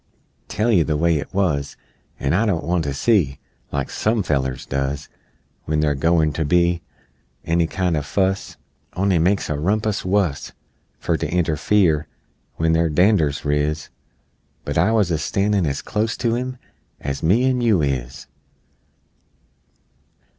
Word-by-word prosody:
Tell 110 +3 0
you 90 -7 +4
the 75 -1 -1
way 85 0 +2
it - - -7
wuz 75 -8 -1 0.4
An' 70 +2 0
I 110 +6 +2
don't 85 -6 0
want 85 -1 0
to 70 - -1
see, 80 - +2 0.3
Like - - -3
some 110 -1 0
fellers 65 -5 -1
does, 70 +2 -3 0.6
When 75 0 0
they're 75 -1 +2
goern 80 +1 +2
to 80 - -1
be 85 +2 +2 0.6
Any 85 0 +2
kind 90 -1 -1
o' 75 - 0
fuss 95 +7 -1 0.4
On'y 95 -1 +1
makes 95 +5 +1
a 75 -1 -2
rumpus 105 +5 0
wuss 90 -6 0 0.4
Fer - - -1
to - - -3
interfere 80 0 +2 0.5
When 80 0 +1
their 80 0 +2
dander's 80 -4 +2
riz 75 +1 -1 0.8
But - - -3
I 90 +7 +3
wuz 105 -6 +2
a 80 - 0
standin' 100 +2 +1
as 70 - -3
clost 110 +2 -1
to 120 -2 +1
'em 130 +1 -4 0.4
As 70 0 -4
me 100 +10 +3
an' 130 -1 +1
you 110 -9 +3
is! 65 -2 -3
85 Hz, 150 wpm, -21 LUFS, 75-100 Hz, 0.8 s, you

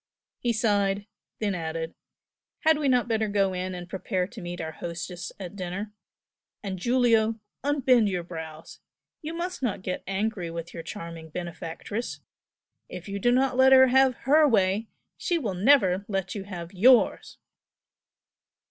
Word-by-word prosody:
He 240 - 0
sighed, 205 -3 +1 0.3
then 205 -2 -1
added 165 -1 -4 0.7
"Had 315 -1 +4
we 290 - 0
not 250 -2 +3
better 220 -2 +1
go 200 -2 +1
in 185 0 -3
and 175 -1 -7
prepare 185 0 -2
to 220 +3 -10
meet 175 0 -6
our 160 -1 -4
hostess 170 +1 -6
at 185 0 -7
dinner? 195 +2 -5 0.7
And 190 -2 -4
Giulio! 230 0 +3 0.2
unbend 260 -6 +3
your 180 -2 -2
brows! 160 -2 -9 0.4
you 320 +2 -5
must 355 0 -4
not 210 -7 -2
get 185 -1 -3
angry 195 -2 -2
with 170 +1 -6
your 165 - -6
charming 165 -1 -8
benefactress! 175 +6 -5 0.7
If 180 +1 -8
you 200 0 -4
do 240 +5 +3
not 255 0 +2
let 265 0 +7
her 260 0 +8
have 265 0 +4
HER 300 +3 +6
way, 205 -2 +2 0.3
she 345 - 0
will 225 - -2
never 195 -2 +4
let 195 -3 -2
you 200 -2 -5
have 175 -3 -7
YOURS!" 240 +6 +4
200 Hz, 155 wpm, -27 LUFS, 180-245 Hz, 0.7 s, her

